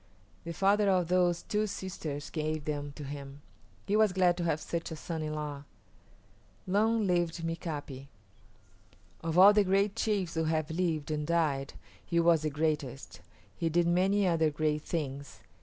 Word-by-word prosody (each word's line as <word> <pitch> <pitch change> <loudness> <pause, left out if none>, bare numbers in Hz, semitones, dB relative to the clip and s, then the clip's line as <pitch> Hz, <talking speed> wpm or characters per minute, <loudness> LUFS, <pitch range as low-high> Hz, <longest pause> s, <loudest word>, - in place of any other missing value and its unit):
The 170 - -4
father 200 +2 +3
of 180 -3 +2
those 180 -1 +2
two 215 0 -1
sisters 160 -7 -5
gave 155 -1 -2
them 145 -1 -3
to 150 - -8
him. 140 0 -8 0.4
He 205 - 0
was 215 -3 +4
glad 180 -1 +3
to 175 - -2
have 155 -2 +1
such 170 +1 -4
a 160 - -5
son 160 +1 -5
in 155 0 -3
law. 145 -2 -5 1.0
Long 215 +3 +2
lived 175 -2 0
Mika´pi. 150 -5 -5 1.2
Of 165 +1 -1
all 195 +3 +9
the 210 0 +4
great 195 +2 +1
chiefs 205 -6 -1
who 160 0 0
have 155 -1 -1
lived 160 -3 -1
and 150 -1 -2
died 150 -5 0 0.3
he 170 - 0
was 165 -2 +4
the 155 - -1
greatest. 150 -3 -3 0.3
He 165 - -1
did 170 +2 +2
many 190 +4 +2
other 165 -3 +2
great 150 0 -1
things. 140 -4 -5
165 Hz, 165 wpm, -30 LUFS, 150-185 Hz, 1.2 s, all